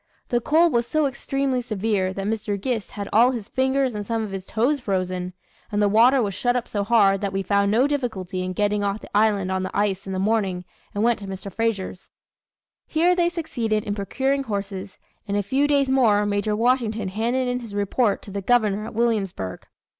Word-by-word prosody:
The 240 -1 +1
cold 320 +5 +3
was 235 0 +1
so 310 +3 +1
extremely 270 -1 -1
severe 210 -4 -1
that 195 +1 -4
Mr. 210 -1 -2
Gist 225 0 -2
had 200 -1 -5
all 235 +3 +6
his 235 -5 -4
fingers 265 -1 +1
and 210 -1 -4
some 225 +1 -2
of 210 - -5
his 195 -1 -6
toes 255 +7 +1
frozen, 185 -4 -2 0.4
and 205 - 0
the 205 - +4
water 240 +5 +5
was 200 -2 -2
shut 245 +5 0
up 245 -1 -1
so 205 -1 -2
hard 200 -3 +4
that 200 -1 -1
we 195 0 -2
found 200 0 +2
no 230 +6 +3
difficulty 220 -11 -2
in 185 0 -3
getting 205 +1 0
off 200 +1 -1
the - - -11
island 205 -3 +2
on 190 0 0
the 185 - -4
ice 195 -2 0
in 190 - -3
the - - -2
morning, 195 -3 0 0.3
and 205 - 0
went 235 0 +2
to 200 - -8
Mr. 195 0 -7
Frazier's." 205 -5 -2 0.8
Here 340 +3 +3
they 345 -1 +2
succeeded 235 - -2
in 205 - -2
procuring 265 +7 -1
horses, 200 -2 -5 0.3
and 200 0 0
in - - +2
a - - -1
few 275 +7 +1
days 280 -2 +3
more, 230 -6 +3
Major 205 +1 0
Washington 225 -3 +1
handed 235 +6 0
in 250 0 -1
his 225 -4 -9
report 205 +2 +1
to 200 - -10
the 200 +1 -3
Governor 215 -2 +2
at - - -9
Williamsburg. 205 - -1
215 Hz, 215 wpm, -23 LUFS, 200-245 Hz, 0.8 s, all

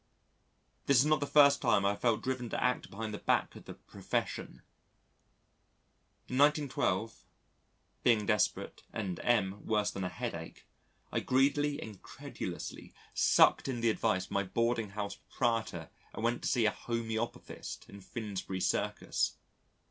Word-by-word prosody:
This 140 - +5
is 130 - +6
not 155 0 +3
the 145 - -2
first 140 -1 +6
time 105 -6 +3
I - - +4
have 100 - -3
felt 115 -3 +2
driven 130 -2 -2
to - - -2
act 125 -1 0
behind 110 +1 -5
the 105 - -5
back - - +1
of - - -12
the - - -8
Profession. - - -4 1.6
In 130 - -2
1912, 140 -8 +1 0.7
being 115 -4 +3
desperate, 105 -2 0
and 95 -5 -3
M 105 -4 +1
worse 105 -2 +1
than 95 - -4
a 90 - -1
headache, 90 -6 -6 0.5
I - - +1
greedily 145 +3 +2
and 105 -4 -8
credulously - - -7 0.2
sucked - - +5
in 125 -3 -2
the 115 -1 +4
advice 105 -4 0
of - - -20
my 100 - +1
boarding 115 +3 0
house 100 0 -4
proprietor 115 -9 -2 0.2
and 110 - -5
went 120 +1 +1
to - - -2
see 120 -3 +2
a 110 - +4
homœopathist 115 -1 -4
in 100 0 -12
Finsbury 100 -3 -5
Circus. - - 0
115 Hz, 150 wpm, -32 LUFS, 100-125 Hz, 1.6 s, is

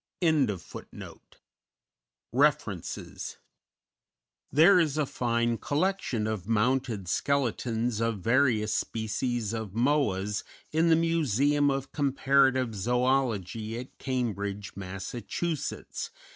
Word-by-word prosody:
_ 135 - -2 1.1
REFERENCES - - -1 1.1
_There 175 +6 +7
is 155 -3 0
a 150 - +2
fine 115 -2 0
collection 145 - 0
of 110 -4 -3
mounted 115 -2 +1
skeletons 120 -1 0
of 115 -2 0
various 115 -1 +2
species 110 0 -2
of 110 -4 -4
Moas 110 -6 +1 0.3
in 160 +2 +3
the 165 - +6
Museum 145 -3 +2
of 135 -1 -2
Comparative 135 -3 +2
Zoology 115 -1 0
at 125 - -10
Cambridge, 105 -6 -3
Mass. 95 -1 -6
120 Hz, 90 wpm, -28 LUFS, 110-140 Hz, 1.1 s, There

